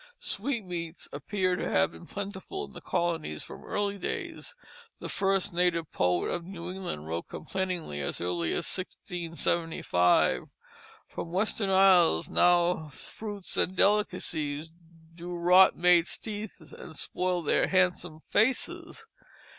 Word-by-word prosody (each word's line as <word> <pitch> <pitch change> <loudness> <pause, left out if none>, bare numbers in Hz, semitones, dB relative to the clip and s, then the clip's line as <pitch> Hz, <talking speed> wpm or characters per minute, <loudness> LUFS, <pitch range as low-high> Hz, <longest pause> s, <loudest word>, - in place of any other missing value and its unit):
Sweetmeats 185 - -3
appear 185 +5 0
to - - -2
have 80 0 +3
been 80 - -13
plentiful 200 - -5
in - - -16
the - - -9
colonies 170 - -1
from - - -10
early 200 -1 -2
days. - - -5 0.4
The - - -7
first 195 -2 +1
native 170 -2 +1
poet 90 -1 +1
of 175 - -2
New 175 -1 -7
England 180 - -5
wrote 85 +1 -4
complainingly 180 - -3
as 70 - -2
early 85 -1 -1
as - - -2
1675 165 - 0
that - - -16 0.6
"From 170 - -6
western 200 +2 +1
isles 185 - +5
now 175 -2 +3
fruits 205 +7 -6
and 185 - +1
delicacies 165 -7 +1 0.4
Do 175 +1 -6
rot 180 +2 +6
maids' 175 -1 +4
teeth 210 -2 -6 0.2
and 160 -3 -10
spoil 180 -1 -1
their 145 - +3
handsome 180 -4 +1
faces." 230 +5 0
175 Hz, 130 wpm, -29 LUFS, 160-190 Hz, 0.6 s, rot